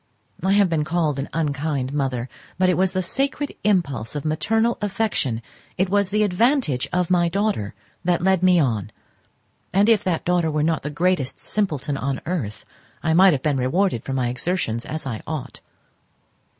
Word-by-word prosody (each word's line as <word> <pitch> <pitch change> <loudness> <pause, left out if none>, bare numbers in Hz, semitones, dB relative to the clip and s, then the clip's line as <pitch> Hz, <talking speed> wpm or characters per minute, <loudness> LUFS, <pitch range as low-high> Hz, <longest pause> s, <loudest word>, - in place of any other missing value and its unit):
I 190 +1 +3
have 200 -1 +5
been 160 -3 0
called 155 -3 0
an 135 - -4
unkind 145 -3 -1
mother, 130 -4 -1 0.3
but 185 0 +3
it - - +4
was 185 0 +1
the 185 -1 0
sacred 275 +8 -1
impulse 150 - 0
of 145 - -4
maternal 225 +9 +1
affection, 190 - -1 0.3
it 185 0 +1
was 200 -1 +2
the 210 +2 +2
advantage 210 - +1
of 180 0 0
my 175 -1 +3
daughter 200 - -1 0.3
that 175 -1 +1
led 190 -1 +3
me 180 -1 +5
on; 110 - 0 0.8
and 200 +3 +3
if 225 -3 +4
that 175 -3 -1
daughter 175 -2 +2
were 150 -1 0
not 160 -1 +1
the 145 - -4
greatest 165 -3 0
simpleton 150 -9 -1
on 135 0 -2
earth, 140 - -3 0.4
I 160 - +2
might 185 +1 +7
have 135 - -2
been 150 -3 +1
rewarded 130 - +1
for 135 - -4
my 125 -2 0
exertions 125 -4 -1
as 155 +1 -4
I 115 -5 -4
ought. 145 -4 -5
165 Hz, 175 wpm, -22 LUFS, 135-190 Hz, 0.8 s, might